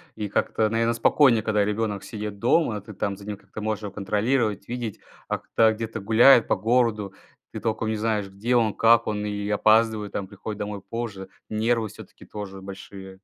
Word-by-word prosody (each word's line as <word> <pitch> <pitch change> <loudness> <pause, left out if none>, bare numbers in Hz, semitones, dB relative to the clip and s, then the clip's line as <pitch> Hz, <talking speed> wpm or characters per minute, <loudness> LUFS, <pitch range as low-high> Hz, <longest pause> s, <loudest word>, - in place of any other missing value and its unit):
И 105 - -3
как-то, 110 +2 0
наверно, 115 +1 +1
спокойнее, 115 -1 +4
когда 105 -2 +2
ребенок 105 -1 -2
сидит 105 -2 -6
дома, 120 -3 +2
ты 105 +1 -11
там 100 0 -2
за 100 - -13
ним, 105 -1 -5
как-то 110 - -10
можешь 110 0 -2
его 100 - -5
контролировать, 105 +1 0
видеть. 120 -3 -5 0.3
А - - 0
когда 110 -1 +2
где-то 110 -1 -5
гуляет 115 +3 +6
по - - +2
городу, 110 -4 +1 0.4
ты - - -6
толком 110 0 -1
не 110 - 0
знаешь, 105 -2 -1
где 105 +6 -1
он, 110 -4 +3
как 115 0 +5
он 105 -1 -2
и 105 -1 -3
опаздывает, 110 0 +3
там 100 -2 -4
приходит 105 +1 -7
домой 105 -1 -4
позже. 100 -5 -6 0.2
Нервы 110 +1 +1
всё-таки - - -13
тоже 95 -2 -8
большие. 95 0 -9
110 Hz, 185 wpm, -25 LUFS, 100-115 Hz, 0.4 s, гуляет